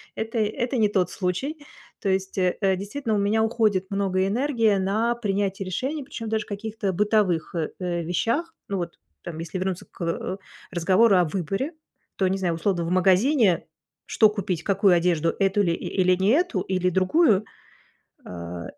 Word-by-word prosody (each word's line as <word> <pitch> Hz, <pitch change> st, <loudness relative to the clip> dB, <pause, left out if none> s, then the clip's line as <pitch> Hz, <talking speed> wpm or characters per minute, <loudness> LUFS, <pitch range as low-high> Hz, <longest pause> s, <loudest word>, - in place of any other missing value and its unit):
это 225 Hz, +1 st, -3 dB
это 235 Hz, +4 st, -1 dB
не 215 Hz, -2 st, +3 dB
тот 185 Hz, -4 st, +1 dB
случай. 200 Hz, -, -2 dB, 0.4 s
То 195 Hz, -, -1 dB
есть, 190 Hz, 0 st, -1 dB
э, 180 Hz, -1 st, +1 dB, 0.2 s
действительно 220 Hz, +4 st, -3 dB
у -, -, +1 dB
меня 210 Hz, +2 st, +2 dB
уходит 215 Hz, -4 st, +1 dB
много 195 Hz, -1 st, 0 dB
энергии 230 Hz, -1 st, +2 dB
на 215 Hz, +5 st, +1 dB
принятие 200 Hz, -3 st, -2 dB
решений, 265 Hz, -, -3 dB
причём 240 Hz, -4 st, -7 dB
даже 220 Hz, -1 st, -1 dB
каких-то 210 Hz, 0 st, -3 dB
бытовых, 200 Hz, -5 st, +1 dB
э 160 Hz, -2 st, -1 dB
э 175 Hz, -2 st, -2 dB
вещах. 230 Hz, -, -1 dB
Ну 200 Hz, -, -2 dB
вот 170 Hz, -2 st, -5 dB, 0.2 s
там, 170 Hz, -2 st, -7 dB
если 165 Hz, +3 st, -5 dB
вернуться 185 Hz, -1 st, -3 dB
к, -, -, -16 dB
э, 170 Hz, +3 st, -2 dB, 0.3 s
разговору 190 Hz, +5 st, +4 dB
о 180 Hz, -, +5 dB
выборе, 195 Hz, -, -2 dB, 0.5 s
то, 190 Hz, -, +2 dB
не 190 Hz, +1 st, 0 dB
знаю, 175 Hz, -3 st, -1 dB
условно 170 Hz, 0 st, 0 dB
в -, -, -3 dB
магазине, 190 Hz, -, +3 dB, 0.4 s
что 215 Hz, -, +4 dB
купить: 190 Hz, -5 st, -3 dB
какую 195 Hz, -1 st, +3 dB
одежду, 170 Hz, -2 st, +1 dB
эту 195 Hz, +1 st, +2 dB
ли 170 Hz, -3 st, +1 dB
и -, -, -5 dB
или 185 Hz, 0 st, +4 dB
не 190 Hz, +2 st, +1 dB
эту, 350 Hz, +6 st, +2 dB
или 185 Hz, -1 st, 0 dB
другую. 200 Hz, -, +3 dB, 0.8 s
А, 85 Hz, -1 st, -7 dB
195 Hz, 170 wpm, -24 LUFS, 180-220 Hz, 0.8 s, о